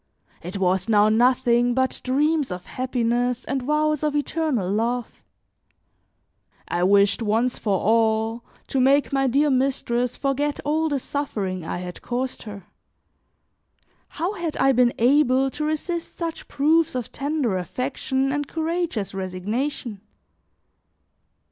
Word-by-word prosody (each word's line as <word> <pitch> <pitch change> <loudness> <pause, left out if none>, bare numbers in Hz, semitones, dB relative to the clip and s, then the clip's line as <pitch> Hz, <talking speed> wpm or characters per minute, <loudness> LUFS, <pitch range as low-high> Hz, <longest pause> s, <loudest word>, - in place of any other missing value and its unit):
It 180 +4 -6
was 190 +2 +1
now 210 -1 +5
nothing 240 +1 +3
but 260 0 0
dreams 295 +3 +1
of 180 -1 -6
happiness 245 -1 -1
and 270 0 -2
vows 300 +2 +1
of 300 -1 0
eternal 290 - 0
love; 230 +5 -2 1.5
I 175 - -1
wished, 200 +4 +4
once 225 +3 0
for 200 -3 +1
all, 225 +1 +1 0.2
to 270 - -1
make 275 +2 +3
my 270 -1 +2
dear 285 +4 +2
mistress 250 -2 0
forget 285 +1 -1
all 315 +2 +1
the 285 - 0
suffering 205 - -3
I 165 - -4
had 180 0 -7
caused 250 +1 -3
her. 200 -3 -9 1.4
How 345 +6 -3
had 340 -6 -4
I 270 - +4
been 245 -1 +3
able 265 +1 +3
to 300 - -4
resist 325 +2 -3
such 330 -2 -5
proofs 310 +2 +2
of 250 -3 -4
tender 275 -9 -1
affection 265 - -2
and 290 0 -2
courageous 325 - -2
resignation? 205 +5 -3
255 Hz, 130 wpm, -23 LUFS, 220-290 Hz, 1.5 s, now